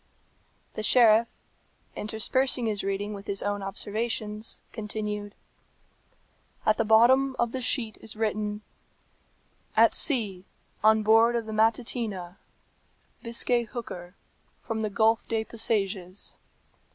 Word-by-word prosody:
The - - -4
sheriff, 230 0 +5 0.7
interspersing 240 +4 0
his 210 -2 -2
reading 195 +2 -2
with 200 0 -9
his 200 -1 -2
own 205 0 -2
observations, 210 +2 -3
continued, 210 -2 -4 1.3
"At 215 - +3
the - - +2
bottom 255 +5 +5
of 235 -1 0
the 260 - -4
sheet 240 -3 0
is 220 - -6
written, 210 -1 -2 1.1
"'At - - +6
sea, 205 - 0 0.4
on 220 0 +5
board 225 +2 +5
of 230 -1 -1
the 220 - -6
Matutina, 220 -4 0 0.8
Biscay 240 +1 +1
hooker, 200 -6 -8 0.5
from 225 -2 -3
the 215 - -1
Gulf 220 +2 +3
de 225 -1 -1
Pasages.' 200 -5 -2
220 Hz, 115 wpm, -27 LUFS, 205-230 Hz, 1.3 s, At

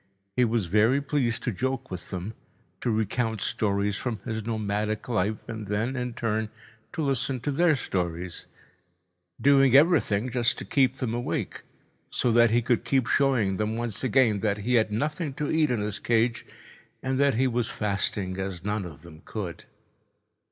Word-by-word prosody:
He 125 - +4
was 115 -3 0
very 110 +9 +3
pleased 135 -5 -1
to 125 - 0
joke 130 +5 -3
with 90 -2 -6
them, 95 +4 -5 0.5
to - - 0
recount 110 +1 0
stories 100 -1 0
from 120 -4 -3
his 110 -3 -3
nomadic 105 -1 -2
life 110 -2 0
and 110 -3 -6
then, 110 +6 -1
in 125 -2 -3
turn, 110 -1 -1 0.4
to 165 -3 -2
listen 135 -1 0
their 155 +3 +3
stories—doing 90 +6 -1
everything 135 - +4
just 120 -1 +1
to - - -6
keep 130 -2 +2
them 125 -4 -3
awake, 120 +1 -3 0.5
so 120 - +1
that 120 0 +5
he 120 +2 +2
could 120 -1 +1
keep 135 -3 +1
showing 115 -9 +2
them 110 +1 -1
once 115 -2 -3
again 125 -4 +3
that 100 0 0
he 125 - +1
had 110 -3 +3
nothing 150 - -2
to 150 0 -2
eat 155 -2 +3
in 120 -4 0
his 105 0 -3
cage 115 0 +1 0.6
and 130 0 -1
that 140 -3 +3
he 130 +4 +2
was 120 -2 0
fasting 100 -2 -1
as 95 -2 -4
none 105 -1 -1
of 80 -3 -10
them 80 -2 -13
could. 95 -6 -6
115 Hz, 165 wpm, -27 LUFS, 100-130 Hz, 0.6 s, that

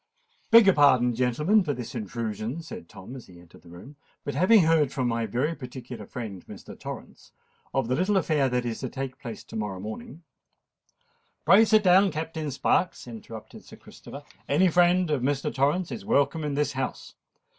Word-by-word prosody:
"Beg 230 -2 +8
your 195 - +6
pardon, 130 -5 +4
gentlemen, 150 - +2
for 145 -5 -2
this 120 -1 -7
intrusion," 115 - -4
said 125 - -10
Tom, 105 +8 -11
as 130 - -11
he 90 -1 -15
entered 85 -1 -18
the 85 - -17
room; 110 - -13 0.3
"but 145 - -4
having 185 +8 +5
heard 160 -4 +3
from 130 -3 -1
my 115 -1 -1
very 130 +9 -1
particular 125 -6 -9
friend 105 -7 -7
Mr. - - -11
Torrens - - -10 0.4
of 135 -4 -1
the 125 - 0
little 185 +8 +1
affair 150 -6 +1
that 125 -1 -1
is 115 -2 -3
to 130 - -4
take 135 0 -6
place 120 -5 -8
to - - -12
morrow 105 -3 -4
morning——" 120 - -8 1.2
"Pray 205 +4 +7
sit 215 -1 +4
down, 190 +1 +5
Captain 160 -1 -4
Sparks," 170 +6 0
interrupted 110 -1 -10
Sir - - -14
Christopher. - - -12 0.3
"Any 180 +6 +4
friend 175 0 +3
of 145 -4 0
Mr. 140 +2 -1
Torrens 150 +7 0
is 215 - -6
welcome 160 -5 +1
in 145 -2 -2
this 145 0 0
house. 130 -1 -5
135 Hz, 185 wpm, -26 LUFS, 120-165 Hz, 1.2 s, Beg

